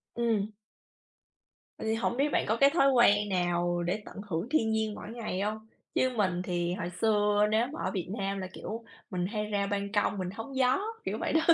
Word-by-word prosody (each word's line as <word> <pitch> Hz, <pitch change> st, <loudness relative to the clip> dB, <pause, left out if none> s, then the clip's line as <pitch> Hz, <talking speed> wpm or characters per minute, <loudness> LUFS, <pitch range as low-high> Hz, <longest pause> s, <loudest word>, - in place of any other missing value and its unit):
Ừm. 225 Hz, -3 st, +1 dB, 1.3 s
Vậy -, -, -5 dB
thì 220 Hz, -, +2 dB
hổng 235 Hz, +1 st, -1 dB
biết 285 Hz, +2 st, +3 dB
bạn -, -, +2 dB
có 220 Hz, +2 st, +2 dB
cái 275 Hz, +3 st, +6 dB
thói 280 Hz, -3 st, +4 dB
quen 210 Hz, -5 st, +5 dB
nào 175 Hz, -1 st, +1 dB
để 180 Hz, +5 st, -1 dB
tận -, -, -8 dB
hưởng 170 Hz, +4 st, -1 dB
thiên 245 Hz, -7 st, +2 dB
nhiên 220 Hz, -1 st, 0 dB
mỗi -, -, -8 dB
ngày 215 Hz, -5 st, -3 dB
hông? 215 Hz, +2 st, -3 dB, 0.3 s
Chứ 260 Hz, -, +3 dB
mình 185 Hz, -4 st, +1 dB
thì 175 Hz, -1 st, -1 dB
hồi 180 Hz, -2 st, -3 dB
xưa 210 Hz, -1 st, +4 dB
nếu 220 Hz, +3 st, +2 dB
mà 320 Hz, -, -6 dB
ở -, -, 0 dB
Việt 185 Hz, -4 st, -3 dB
Nam 195 Hz, -1 st, -1 dB
là, 185 Hz, -, -4 dB
kiểu, 225 Hz, +2 st, -6 dB, 0.3 s
mình 180 Hz, -3 st, -1 dB
hay 210 Hz, +1 st, -2 dB
ra 205 Hz, -1 st, 0 dB
ban 200 Hz, 0 st, -2 dB
công, 205 Hz, 0 st, +1 dB
mình 185 Hz, -2 st, -2 dB
hóng 225 Hz, +6 st, -7 dB
gió, 260 Hz, 0 st, +3 dB, 0.3 s
kiểu -, -, -1 dB
vậy -, -, -1 dB
đó. 320 Hz, +1 st, +5 dB
210 Hz, 220 wpm, -30 LUFS, 190-230 Hz, 1.3 s, cái